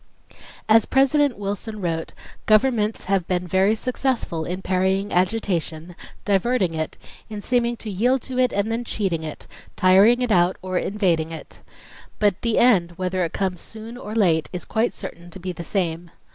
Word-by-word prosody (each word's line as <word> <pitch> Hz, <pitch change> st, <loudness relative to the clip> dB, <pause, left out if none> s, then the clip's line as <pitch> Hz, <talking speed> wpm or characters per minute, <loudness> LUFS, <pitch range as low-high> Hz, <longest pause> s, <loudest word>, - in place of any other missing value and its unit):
"As 220 Hz, 0 st, +5 dB
President 275 Hz, 0 st, +3 dB
Wilson 205 Hz, +2 st, -4 dB
wrote, 165 Hz, -3 st, -3 dB, 0.3 s
'Governments 215 Hz, -1 st, +2 dB
have 190 Hz, -2 st, 0 dB
been 180 Hz, -1 st, -1 dB
very 190 Hz, +4 st, +3 dB
successful 240 Hz, -8 st, -2 dB
in 185 Hz, +2 st, -4 dB
parrying 190 Hz, +2 st, 0 dB
agitation, 180 Hz, -4 st, -1 dB, 0.3 s
diverting 200 Hz, -2 st, +1 dB
it, 160 Hz, -1 st, -4 dB, 0.3 s
in 210 Hz, -1 st, -6 dB
seeming 240 Hz, +2 st, 0 dB
to 225 Hz, -, -9 dB
yield 245 Hz, +6 st, +1 dB
to 255 Hz, -1 st, -4 dB
it 250 Hz, -1 st, +3 dB
and 200 Hz, +2 st, -1 dB
then 230 Hz, +2 st, -1 dB
cheating 195 Hz, -8 st, -2 dB
it, 155 Hz, -2 st, -7 dB, 0.3 s
tiring 200 Hz, +7 st, +5 dB
it 245 Hz, -, -1 dB
out 175 Hz, -1 st, +3 dB
or 185 Hz, -1 st, -1 dB
evading 175 Hz, -6 st, 0 dB
it. 165 Hz, -1 st, -10 dB, 0.6 s
But 205 Hz, -3 st, +1 dB
the 230 Hz, -2 st, +1 dB
end, 185 Hz, -9 st, +4 dB
whether 185 Hz, 0 st, -1 dB
it 165 Hz, -, -2 dB
comes 185 Hz, -3 st, -2 dB
soon 225 Hz, +2 st, -9 dB
or 215 Hz, -3 st, -7 dB
late, 170 Hz, -8 st, +2 dB
is 180 Hz, -, -6 dB
quite 230 Hz, +2 st, 0 dB
certain 175 Hz, -3 st, -9 dB
to 190 Hz, -, -10 dB
be 185 Hz, +1 st, -4 dB
the 170 Hz, -1 st, -7 dB
same. 170 Hz, -2 st, -2 dB
195 Hz, 170 wpm, -23 LUFS, 180-225 Hz, 0.6 s, As